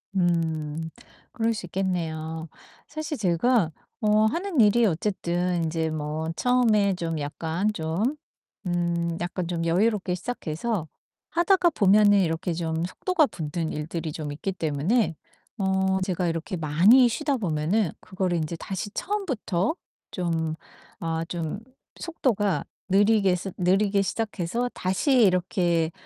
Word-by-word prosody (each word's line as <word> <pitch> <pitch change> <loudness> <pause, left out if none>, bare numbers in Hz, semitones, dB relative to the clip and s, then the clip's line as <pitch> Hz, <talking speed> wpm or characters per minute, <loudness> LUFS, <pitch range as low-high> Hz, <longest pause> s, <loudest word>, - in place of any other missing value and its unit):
음. 160 -3 0 0.4
그럴 230 -1 0
수 210 - -5
있겠네요. 165 -3 -3 0.4
사실 310 0 -4
제가 190 0 +2 0.3
어 215 0 +4
하는 335 - -1
일이 225 +2 +5
어쨌든 175 -2 0
인제 160 0 -1
뭐 155 +1 -3
처음에 220 -3 +3
좀 165 -2 -3
약간 160 +7 -1
좀 185 - -1 0.5
음 170 -1 -1
약간 175 0 -3
좀 170 -1 -2
여유롭게 185 +1 +1
시작해서 185 -2 -3 0.4
하다가 350 +1 +4
보면은 205 -3 +5
이렇게 170 +1 -1
좀 165 0 -2
속도가 325 - +1
붙는 160 - -4
일들이 155 +1 -4
좀 150 -2 -5
있기 190 +6 -3
때문에 165 - 0 0.4
어 190 -1 +1
제가 185 -1 -1
이렇게 165 +2 -3
많이 180 - +5
쉬다 285 +4 0
보면은 175 - 0
그거를 185 -2 -2
인제 160 +1 -2
다시 190 +4 -5
처음부터 270 - -1 0.4
좀 165 -3 -1 0.5
아 165 0 -2
좀 170 +3 -4 0.4
속도가 210 - 0 0.2
느리게 200 -1 +4
스 185 +2 -5
느리게 195 +2 +2
시작해서 215 +3 -2
다시 190 +10 0
이렇게 175 -3 +2
180 Hz, 260 characters per minute, -26 LUFS, 165-215 Hz, 0.5 s, 일이